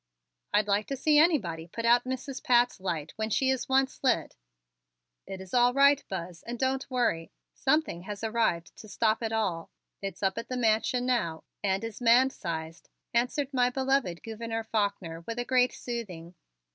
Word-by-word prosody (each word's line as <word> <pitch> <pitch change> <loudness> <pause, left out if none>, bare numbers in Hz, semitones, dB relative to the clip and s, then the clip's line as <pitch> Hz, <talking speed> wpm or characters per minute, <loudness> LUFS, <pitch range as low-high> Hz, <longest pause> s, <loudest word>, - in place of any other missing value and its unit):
"I'd 210 0 +2
like 205 +1 +1
to 275 - -3
see 300 +3 +4
anybody 185 - +2
put 230 +6 -5
out 240 +2 +5
Mrs. 260 +1 -5
Pat's 245 -2 +3
light 165 -5 -3
when 220 0 -2
she 265 +4 +2
is 265 0 -2
once 265 +1 +1
lit." 260 - +1 0.9
"It's 190 -1 -8
all 245 0 +4
right, 280 +1 +5
Buzz, 175 -2 -5
and 240 +1 -6
don't 265 +2 -1
worry. 235 -11 0 0.2
Something 275 - 0
has 205 +3 -7
arrived 220 -7 0
to 215 - -11
stop 220 +3 +1
it 225 -1 -2
all. 190 -7 -1 0.3
It's 195 -1 -6
up 190 +3 +1
at 230 - -8
the 255 - -2
Mansion 235 +2 +1
now 215 -11 0 0.2
and 195 +1 0
is 225 +1 -6
man 245 +3 +5
sized," 165 -5 -6 0.2
answered 255 +4 0
my 250 -1 +3
beloved 265 -9 0
Gouverneur 225 0 -4
Faulkner 200 -7 -2
with 230 - -4
a 245 - -2
great 250 -1 +3
soothing. 185 -9 -6
230 Hz, 170 wpm, -29 LUFS, 190-255 Hz, 0.9 s, out